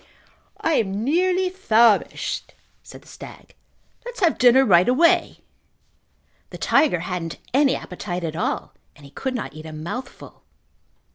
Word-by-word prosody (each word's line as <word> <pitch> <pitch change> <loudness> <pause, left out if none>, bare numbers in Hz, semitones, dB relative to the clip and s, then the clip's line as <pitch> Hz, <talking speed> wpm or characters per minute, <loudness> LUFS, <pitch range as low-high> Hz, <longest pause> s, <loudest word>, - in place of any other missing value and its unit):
"I 325 - 0
am 200 0 -1
nearly 365 +6 +1
famished," 230 - +1 0.3
said - - -14
the - - -22
stag. - - -13 0.5
"Let's - - -9
have 340 -4 +2
dinner 255 +2 +5
right 180 -1 +4
away." 330 +7 +2 1.1
The - - -9
tiger 275 - +2
hadn't 170 -2 -5 0.2
any 275 0 +3
appetite 180 -1 -6
at 160 -1 -4
all 165 - -3 0.2
and 145 - -16
he 140 - -15
could 265 - -4
not 245 - -5
eat 155 +1 -10
a - - -8
mouthful. 170 +13 -8
235 Hz, 140 wpm, -22 LUFS, 175-295 Hz, 1.1 s, dinner